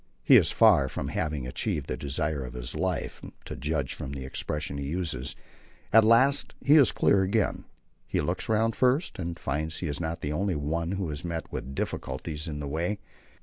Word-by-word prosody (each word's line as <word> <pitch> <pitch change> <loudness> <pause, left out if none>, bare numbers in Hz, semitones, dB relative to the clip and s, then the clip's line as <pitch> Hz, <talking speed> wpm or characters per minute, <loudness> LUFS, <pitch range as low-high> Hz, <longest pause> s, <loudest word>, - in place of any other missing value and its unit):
He - - +7
is - - +6
far - - +5
from - - -4
having 75 -5 -2
achieved 65 +3 -2
the - - -3
desire 70 0 -2
of 60 -1 -7
his 60 -1 -4
life 90 +2 -2 0.2
to - - -6
judge 70 0 -2
from 65 - -6
the 65 -2 -5
expressions 70 +1 -3
he 70 - -4
uses. 75 -5 -2 0.6
At 115 0 +8
last 130 +6 +4
he 145 - +5
is 140 -7 +7
clear 100 - +3
again. 100 +3 0 0.4
He - - 0
looks - - -2
round 110 +1 +2
first 130 - +1
and 85 -1 -3
finds 80 +3 -2
he 90 - -3
is 75 -1 -3
not 85 0 -3
the 75 - -2
only 95 +2 0
one 80 +4 -1
who 95 -4 -2
has 75 -2 -5
met 85 -2 -4
with 70 +1 -5
difficulties 75 +2 -4
in 75 -2 -4
the 70 - -4
way. 85 +8 -1
80 Hz, 195 wpm, -28 LUFS, 70-95 Hz, 0.6 s, At